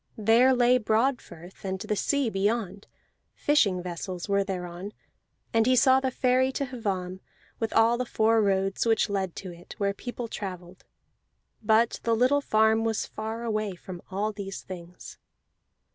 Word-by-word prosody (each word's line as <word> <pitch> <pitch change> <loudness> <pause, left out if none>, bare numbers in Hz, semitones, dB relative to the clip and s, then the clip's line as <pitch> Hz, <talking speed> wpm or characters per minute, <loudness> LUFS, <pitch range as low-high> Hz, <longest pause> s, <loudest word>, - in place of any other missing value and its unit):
There 225 +4 +5
lay 245 +1 +4
Broadfirth, 220 -6 -2
and 190 -1 -2
the 210 - -2
sea 275 +2 0
beyond; 205 0 -1 0.5
fishing 200 -12 +2
vessels 180 +1 -5
were 200 -1 +2
thereon. 185 +1 -6 0.6
And 225 0 +3
he 255 - +4
saw 260 +1 +5
the 265 0 -1
ferry 255 +1 +2
to 280 - -1
Hvamm, 195 -7 -4 0.4
with 225 -1 -2
all 230 +2 +4
the 250 - -1
four 225 0 +3
roads 195 -1 +1
which 225 -1 +2
led 190 -3 -2
to 185 - -7
it, 170 +1 -13
where 200 -2 0
people 245 +3 -6
travelled; 185 -4 -8 0.8
but 220 +2 +2
the 230 -1 +1
little 255 +5 +3
farm 220 -2 +3
was 225 -1 -1
far 220 +2 -6
away 215 -4 -2
from 180 0 -9
all 205 +3 -1
these 200 -2 -7
things. 180 -1 -10
215 Hz, 155 wpm, -27 LUFS, 190-235 Hz, 0.8 s, There